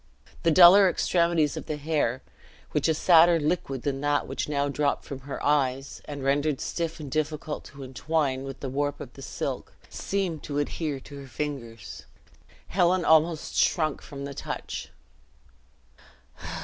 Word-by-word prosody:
The 165 - +3
duller 185 +4 +8
extremities 170 -4 +1
of - - -7
the 155 - -3
hair, 145 -5 -1 0.5
which - - +1
a 160 - +3
sadder 170 +1 +6
liquid 145 -4 -2
than 135 -1 -2
that 145 -1 +1
which 135 +2 -3
now 140 -1 0
dropped 145 0 -1
from 140 - -6
her 135 +1 -7
eyes 135 -2 0
and 145 -2 -6
rendered 140 +1 +1
stiff 165 -1 -3
and 145 -3 -7
difficult 155 0 -2
to 140 0 -10
entwine 135 0 -1
with 135 -1 -8
the 135 - -3
warp 145 +2 -2
of - - -9
the - - -12
silk, - - -5 0.2
seemed 190 -6 -2
to 145 -1 -5
adhere 145 0 -2
to 145 - -11
her 135 - -10
fingers. 120 -6 -6 0.6
Helen 180 -1 +2
almost 160 0 +3
shrunk 155 -4 +2
from 140 -1 -8
the 140 - -6
touch. - - -5
145 Hz, 155 wpm, -27 LUFS, 140-160 Hz, 0.6 s, duller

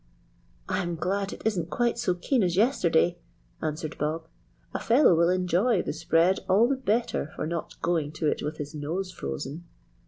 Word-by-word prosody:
"I'm 175 -1 -1
glad 195 +4 -1
it - - -9
isn't 180 -7 0
quite 240 +3 0
so 180 - +1
keen 240 +8 +1
as 175 -3 +1
yesterday," 175 - +3 0.4
answered 155 0 -4
Bob. 155 +2 -1 0.5
"A - - -2
fellow 240 -3 +5
will 170 +1 +4
enjoy 185 +4 +2
the - - -3
spread 165 +3 +2
all 205 +6 +5
the 275 - +1
better 230 - -1
for - - -3
not 170 +1 -4
going 160 -4 0
to 155 0 -1
it - - 0
with 150 +2 -4
his 150 0 -6
nose 165 +6 -3
frozen." 135 - -5
175 Hz, 175 wpm, -27 LUFS, 160-195 Hz, 0.5 s, fellow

